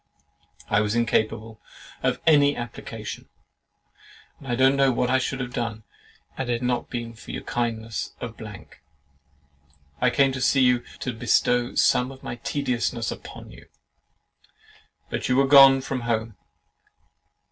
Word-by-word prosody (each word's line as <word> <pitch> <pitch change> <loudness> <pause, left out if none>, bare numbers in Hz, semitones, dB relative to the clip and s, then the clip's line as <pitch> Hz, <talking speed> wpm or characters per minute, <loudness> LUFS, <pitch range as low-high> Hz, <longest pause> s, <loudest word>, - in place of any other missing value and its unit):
I 105 0 +2
was 105 +1 -1
incapable 110 -1 -1 0.4
of - - 0
any 145 -2 +5
application, 120 0 -7 1.1
and 125 -4 -3
don't 130 +1 +4
know 135 -1 +4
what 125 0 0
I 130 - +4
should 135 +1 -3
have 125 -1 -5
done, 110 -2 -3 0.5
had 130 -2 -3
it 120 0 -1
not 125 -1 -1
been 120 -1 -5
for 110 - -16
the - - -4
kindness 115 -2 -3
of - - -6 0.8
——. 70 0 -36
I - - +4
came 135 -1 +3
to 130 -1 -5
see 135 +1 +3
you, 125 -1 +4 0.2
to 125 - -3
"bestow 120 +1 +1
some 125 +2 +3
of 130 - -14
my 120 - -5
tediousness 120 -3 -2
upon - - -10
you," - - -15 1.4
but - - -3
you 125 - +3
were 135 +1 +4
gone 135 -1 +8
from 130 0 -3
home. 115 -2 -2
120 Hz, 145 wpm, -24 LUFS, 110-130 Hz, 1.4 s, gone